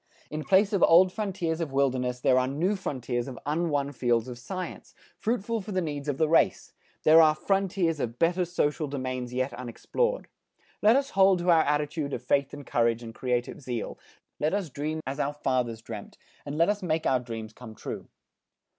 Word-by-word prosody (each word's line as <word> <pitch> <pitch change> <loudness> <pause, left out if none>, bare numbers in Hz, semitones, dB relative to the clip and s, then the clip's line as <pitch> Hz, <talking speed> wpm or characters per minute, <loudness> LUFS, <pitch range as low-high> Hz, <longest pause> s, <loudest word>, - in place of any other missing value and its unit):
In 155 0 -3
place 195 +6 +3
of 195 - +1
old 180 +2 +6
frontiers 180 -6 -2
of 160 -4 -3
wilderness, 130 -2 0
there 130 +1 +4
are 130 - +1
new 165 +10 0
frontiers 125 - -3
of 130 -3 -7
unwon 145 -2 0
fields 120 -2 +1
of 120 -1 -7
science, 185 +9 -7 0.2
fruitful 230 0 -1
for 205 - -8
the 185 - +1
needs 150 -4 -4
of 145 -2 -1
the 160 - +2
race; 165 +2 +2 0.3
there 160 +1 +8
are 155 -1 +5
frontiers 185 -3 0
of 115 -2 -3
better 175 +4 +2
social 155 -3 -1
domains 130 -3 -4
yet 130 +2 -1
unexplored. 475 - -2 0.5
Let 215 +3 +6
us 275 +1 +1
hold 190 -1 +5
to 175 0 +2
our 165 -1 +6
attitude 150 0 -1
of - - -4
faith 140 -1 +1
and 145 -1 -9
courage, 115 0 +1
and 115 -1 -8
creative 125 +2 -2
zeal. 125 -3 -4 0.4
Let 155 +5 +1
us 190 -7 -3
dream 155 +4 -3
as 135 +2 -4
our 145 +1 0
fathers 125 -5 -1
dreamt 110 -3 -8 0.3
and 145 +1 -4
let 170 +4 +4
us 205 0 0
make 160 -3 -1
our 130 - +3
dreams 115 -3 -7
come 110 -2 -11
true. - - -7
145 Hz, 190 wpm, -27 LUFS, 125-175 Hz, 0.5 s, there